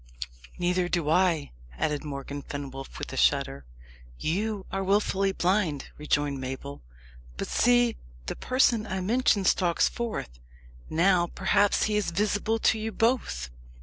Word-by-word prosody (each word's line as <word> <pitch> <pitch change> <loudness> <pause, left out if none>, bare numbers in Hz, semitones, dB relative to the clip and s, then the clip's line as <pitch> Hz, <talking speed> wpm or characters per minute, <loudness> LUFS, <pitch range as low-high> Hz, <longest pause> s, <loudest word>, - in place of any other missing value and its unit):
"Neither 180 0 +1
do 165 -4 0
I," 170 -4 +2 0.3
added 150 - -1
Morgan 140 -1 -5
Fenwolf, 135 -1 -7
with - - -6
a - - -5
shudder. 65 +2 +2 0.5
"You 200 - -2
are 195 0 -1
wilfully 195 0 +2
blind," 180 -6 0
rejoined 145 -2 0
Mabel. 135 +2 -6 0.6
"But - - -3
see, 240 -1 +3 0.3
the - - -4
person 245 -4 +2
I 190 -1 -2
mentioned 210 -1 +2
stalks 175 -2 +3
forth. 215 - -4 0.5
Now, 175 +1 +3
perhaps, 195 +3 +2
he 210 -1 +1
is 210 - 0
visible 210 +4 0
to 220 0 +2
you 220 +1 -3
both." 220 - 0
185 Hz, 135 wpm, -27 LUFS, 145-210 Hz, 0.6 s, see